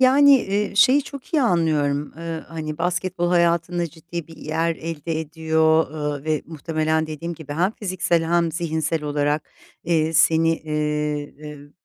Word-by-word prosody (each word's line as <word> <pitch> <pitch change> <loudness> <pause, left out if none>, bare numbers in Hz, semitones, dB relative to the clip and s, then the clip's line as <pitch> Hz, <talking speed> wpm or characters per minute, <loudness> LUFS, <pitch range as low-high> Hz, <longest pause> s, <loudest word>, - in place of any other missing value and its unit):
Yani, 270 +1 +6 0.2
ııı, 200 - -10
şeyi 260 +7 +6
çok 280 -1 -10
iyi 300 - +4
anlıyorum, 150 - +1
ııı, 165 -1 -5
hani, 155 -1 -5
basketbol 180 0 -1
hayatında 170 0 +2
ciddi 170 +1 -7
bir 165 - -13
yer 160 +2 -1
elde 165 0 -4
ediyor, 160 0 +2
ııı, 150 -2 -4
ve 155 -1 0
muhtemelen 160 0 -1
dediğim 160 +2 -5
gibi 150 -3 -8
hem 175 +6 +1
fiziksel 185 -5 0
hem 170 -1 +2
zihinsel 160 -1 -1
olarak, 145 0 -1 0.4
eee, 160 -1 +1
seni, 165 +1 +4
eee, 150 -1 -2 0.2
eb 145 -1 -10
160 Hz, 145 wpm, -22 LUFS, 155-170 Hz, 0.4 s, Yani